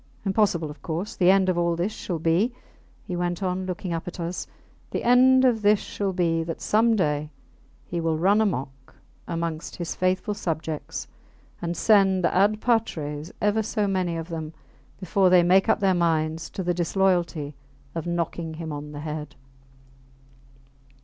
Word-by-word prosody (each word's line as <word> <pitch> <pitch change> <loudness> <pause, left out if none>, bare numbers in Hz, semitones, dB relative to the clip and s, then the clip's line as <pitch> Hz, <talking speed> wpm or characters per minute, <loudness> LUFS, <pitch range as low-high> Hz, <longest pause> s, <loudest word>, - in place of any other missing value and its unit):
Impossible 190 -6 +1
of 150 - -14
course. 170 +5 -4
The 180 -1 +4
end 190 0 +5
of 180 -2 +1
all 170 0 +1
this 175 +5 -1
shall 180 -4 -4
be, 170 +10 +1 0.5
he 180 - -4
went 175 +1 -2
on, 185 0 -2
looking 180 -1 -3
up 165 +1 -4
at 180 - -7
us 170 +1 -4 0.4
the - - -3
end 255 +2 +6
of 235 -4 +3
this 210 0 +5
shall 200 -1 -3
be, 165 -3 +1
that 165 0 -5
some 225 +2 +3
day 150 -5 0 0.6
he 170 -1 -3
will 165 -1 0
run 200 +6 +3
amuck 135 -9 -3 0.3
amongst 165 -1 -3
his 170 -2 -4
faithful 185 +3 0
subjects 160 -5 -4 0.5
and 170 0 -3
send 195 -4 +4
ad 205 +5 +2
patres 160 -10 -1
ever 210 +1 +3
so 215 0 -1
many 185 -3 0
of 165 +1 -6
them 160 -1 -5 0.4
before 185 0 +2
they 180 -1 +6
make 185 +2 +4
up - - +3
their 195 -1 +4
minds 160 -2 0
to 190 - -5
the 175 0 +1
disloyalty 175 -4 0 0.4
of 165 0 -4
knocking 170 -1 -2
him 160 -1 -6
on 150 +1 -7
the 145 - -6
head. 150 -2 -6
175 Hz, 165 wpm, -25 LUFS, 165-195 Hz, 0.6 s, end